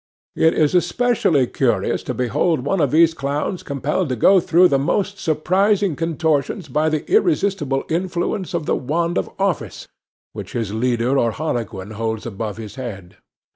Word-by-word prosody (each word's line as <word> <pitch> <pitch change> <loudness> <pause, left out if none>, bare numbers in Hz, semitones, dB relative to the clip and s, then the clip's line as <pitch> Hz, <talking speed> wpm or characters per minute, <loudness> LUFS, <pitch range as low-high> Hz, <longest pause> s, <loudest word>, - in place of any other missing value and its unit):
It 160 - +3
is 155 0 +2
especially 180 - +2
curious 115 -6 0
to 125 - -1
behold 125 +6 0
one 165 +7 0
of 145 - +2
these 160 +3 +4
clowns 145 +5 -3
compelled 145 +4 -2
to 130 - -1
go 190 - +5
through 175 +1 +4
the 135 - +2
most 195 +7 -1
surprising 185 +3 +1
contortions 160 +2 -1
by 155 +1 +1
the 155 -1 -2
irresistible 195 - +1
influence 180 +2 -2
of - - -2
the - - +1
wand 170 +6 -1
of - - -4
office, 195 -3 -2 0.5
which - - -8
his 110 -4 -3
leader 120 +3 +1
or 115 - +2
harlequin 110 - -4
holds 110 0 -3
above 105 -2 -5
his 110 +2 -9
head. 95 -8 -8
150 Hz, 160 wpm, -20 LUFS, 125-175 Hz, 0.5 s, go